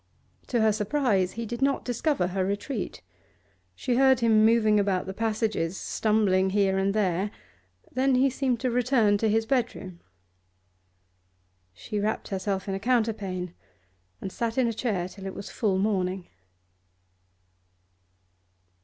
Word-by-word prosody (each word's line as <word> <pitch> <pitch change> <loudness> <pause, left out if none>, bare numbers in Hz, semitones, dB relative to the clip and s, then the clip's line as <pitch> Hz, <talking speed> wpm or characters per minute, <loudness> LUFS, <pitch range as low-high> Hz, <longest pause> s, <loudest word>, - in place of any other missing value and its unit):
To 240 -3 +1
her 220 0 +4
surprise 210 -3 +1
he 230 0 -4
did 240 +3 -5
not 275 0 +1
discover 245 - 0
her 190 +1 -1
retreat; 200 +8 -4 0.7
she 245 -2 -1
heard 265 -1 +5
him 220 -2 +4
moving 220 -2 +4
about 195 -2 0
the 190 - -5
passages, 215 -5 -1
stumbling 200 -4 +1
here 195 -1 +2
and 195 +1 0
there, 195 -1 +1 0.6
then 260 +1 +2
he 260 +2 +4
seemed 255 -2 0
to 255 - 0
return 235 -4 +2
to 220 - +1
his 225 +1 +2
bedroom. 225 -8 -2 1.7
She 95 - -5
wrapped 215 +2 -2
herself 195 0 -2
in 195 - -2
a 195 - -2
counterpane, 205 -6 -1 0.7
and 190 - -6
sat 230 +2 -3
in 260 - +3
a 230 - -1
chair 210 -6 -1
till 195 +1 -9
it 190 - -6
was 200 - -7
full 200 -5 0
morning. 190 -2 -1
215 Hz, 140 wpm, -27 LUFS, 190-235 Hz, 1.7 s, heard